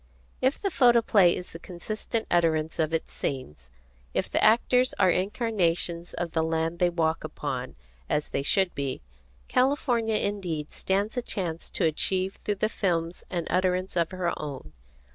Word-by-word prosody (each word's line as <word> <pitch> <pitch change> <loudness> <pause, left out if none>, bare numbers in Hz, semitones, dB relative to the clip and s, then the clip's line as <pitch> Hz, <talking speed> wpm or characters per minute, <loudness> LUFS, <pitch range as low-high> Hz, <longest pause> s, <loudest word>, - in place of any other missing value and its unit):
If 260 +2 +2
the 395 - -1
photoplay 230 - +5
is 180 - -7
the 165 - -9
consistent 215 +6 -4
utterance 160 -2 +2
of 160 -1 +1
its 165 - -2
scenes, 75 - -5 0.5
if - - -1
the - - +2
actors 250 +3 +4
are 185 -2 +5
incarnations 180 -4 0
of 175 -1 -3
the 160 - +1
land 160 +1 -1
they 180 - +4
walk 165 -2 0
upon, - - -4 0.3
as 150 0 0
they - - -1
should 190 +5 +2
be, 135 - -3 0.4
California 250 -4 +2
indeed 185 -8 -2
stands 200 +5 -1
a - - +2
chance 175 -8 -4
to 180 - 0
achieve 185 +4 0
through 205 - 0
the 215 - +1
films 170 -5 -1
an 175 -3 -2
utterance 185 0 +1
of 170 -2 +2
her 185 -2 -1
own. 135 - -7
180 Hz, 160 wpm, -27 LUFS, 165-210 Hz, 0.5 s, photoplay